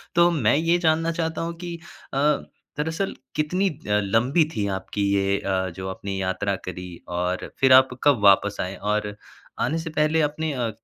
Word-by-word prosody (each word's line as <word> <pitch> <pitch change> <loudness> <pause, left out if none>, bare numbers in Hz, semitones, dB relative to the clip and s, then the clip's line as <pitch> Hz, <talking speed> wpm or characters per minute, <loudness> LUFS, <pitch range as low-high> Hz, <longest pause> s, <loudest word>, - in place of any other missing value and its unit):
तो 170 0 +6
मैं 140 -7 +2
ये 165 +3 +2
जानना 165 0 +2
चाहता 165 -1 -2
हूँ 170 0 -3
कि 175 -1 -4 0.4
अ, - - -1 0.6
दरअसल 160 +6 -2 0.2
कितनी 180 +6 +1
अ, 155 - -8 0.3
लंबी 125 - +2
थी 100 -1 0
आपकी 95 +2 -5
ये 100 0 +2
अ, 95 -1 -1
जो 95 0 -6
आपने 95 +1 -5
यात्रा 95 +1 -1
करी 90 -1 -7
और 90 +1 -2
फ़िर 130 -1 +6
आप 130 0 +7
कब 140 -6 +4
वापस 100 +1 +5
आए 95 +1 -4
और 105 0 -2 0.4
आने 160 - 0
से 165 - -5
पहले 155 +1 +2
आपने 150 +1 -1
अ, 120 -3 -1
130 Hz, 175 wpm, -24 LUFS, 100-160 Hz, 0.6 s, आप